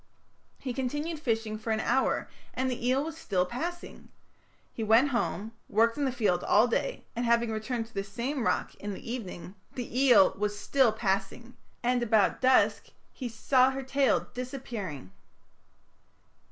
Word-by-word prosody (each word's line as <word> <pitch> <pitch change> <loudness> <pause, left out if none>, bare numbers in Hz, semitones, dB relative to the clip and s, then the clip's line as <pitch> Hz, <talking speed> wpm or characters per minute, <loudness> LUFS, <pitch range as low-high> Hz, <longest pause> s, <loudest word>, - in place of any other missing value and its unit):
He 255 - -5
continued 295 +5 -3
fishing 225 -5 -1
for 225 - -6
an 220 0 +1
hour 260 +4 +1 0.3
and 260 0 0
the 245 -1 -3
eel 265 +2 +2
was 320 +1 -5
still 195 - 0
passing. 335 - -6 0.6
He 225 - -4
went 225 +6 +5
home, 225 -4 -2 0.2
worked 230 +2 +3
in 290 - -1
the 265 - +1
field 210 -8 +1
all 215 +4 +4
day, - - -2
and 240 - -1
having 235 -1 +2
returned 225 +2 -3
to 225 - -20
the 195 - -2
same 240 +7 -3
rock - - 0
in 205 -1 -6
the 230 - -8
evening, 185 -6 -7 0.2
the 245 0 -3
eel 240 -8 +6
was 205 0 -2
still 260 +2 +3
passing, 215 +3 -2 0.3
and 245 0 +2
about 220 -4 +2
dusk 260 0 +3 0.3
he 250 -3 -5
saw 255 +3 +3
her 265 0 -4
tail 270 0 +2
disappearing." 235 - -6
235 Hz, 160 wpm, -29 LUFS, 215-260 Hz, 0.6 s, eel